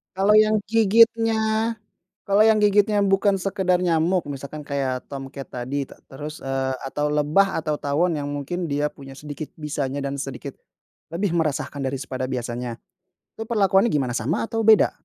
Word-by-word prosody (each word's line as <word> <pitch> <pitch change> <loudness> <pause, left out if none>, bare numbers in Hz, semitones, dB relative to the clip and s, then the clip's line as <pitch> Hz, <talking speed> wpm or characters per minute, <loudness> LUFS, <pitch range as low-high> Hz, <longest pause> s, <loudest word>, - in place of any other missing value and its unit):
Kalau 195 +2 +3
yang 215 0 +5
gigitnya 225 +1 +3 0.5
kalau 205 +2 +5
yang 220 -1 +4
gigitnya 205 0 +3
bukan 195 0 +2
sekedar 185 -2 +1
nyamuk 175 +1 +2
misalkan 140 +2 -6
kayak 135 -3 -2
tomcat 135 0 -7
tadi 130 +3 -3
ta - - -14
terus, 150 +3 -8
eee, 135 0 -1
atau 145 +2 -1
lebah 150 +7 +2
atau 155 -1 -1
tawon 160 +5 +1
yang 145 -2 -3
mungkin 155 +5 -4
dia 145 +1 0
punya 135 -1 -12
sedikit 150 +1 -7
bisanya 145 -3 -3
dan 140 -1 -3
sedikit, 135 0 -6 0.6
lebih 175 +2 -1
meresahan 150 -3 -1
dari 135 0 -2
pada 130 -1 -4
biasanya, 120 -2 -4 0.6
itu 225 - -5
perlakuannya 200 -2 +3
gimana 140 - 0
sama 120 +5 -1
atau 225 -1 -1
beda? 220 -2 +6
155 Hz, 155 wpm, -23 LUFS, 140-200 Hz, 0.6 s, beda